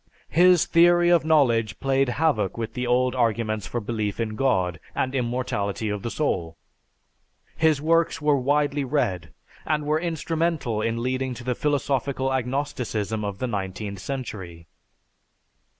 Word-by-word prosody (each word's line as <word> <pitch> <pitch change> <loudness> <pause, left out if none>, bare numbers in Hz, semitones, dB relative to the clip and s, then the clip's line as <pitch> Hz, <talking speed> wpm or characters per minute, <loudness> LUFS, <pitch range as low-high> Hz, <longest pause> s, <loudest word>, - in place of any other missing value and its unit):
His 180 +1 +5
theory 175 +1 +5
of 170 -3 +4
knowledge 120 -9 +2
played 135 -1 +1
havoc 120 - 0
with 115 -1 -4
the 125 -1 -3
old 125 +1 +2
arguments 110 -4 0
for 120 - -3
belief 105 -2 -3
in 110 -2 -2
God 95 -9 +1 0.2
and 130 - -1
immortality 120 -5 -2
of 105 -1 -3
the 115 - -3
soul. 85 - -2 1.0
His 160 -3 +3
works 165 +1 +2
were 150 0 +3
widely 145 +2 +1
read 95 - -1 0.3
and 150 -1 -1
were 155 +1 +1
instrumental 165 -7 -1
in 115 +1 -1
leading 130 0 -1
to 120 - -9
the 125 +1 0
philosophical 135 -1 -1
agnosticism 125 -5 -2
of 100 -2 -4
the 130 - -2
nineteenth 100 -2 -4
century. 95 -9 -6
125 Hz, 140 wpm, -24 LUFS, 110-145 Hz, 1.0 s, His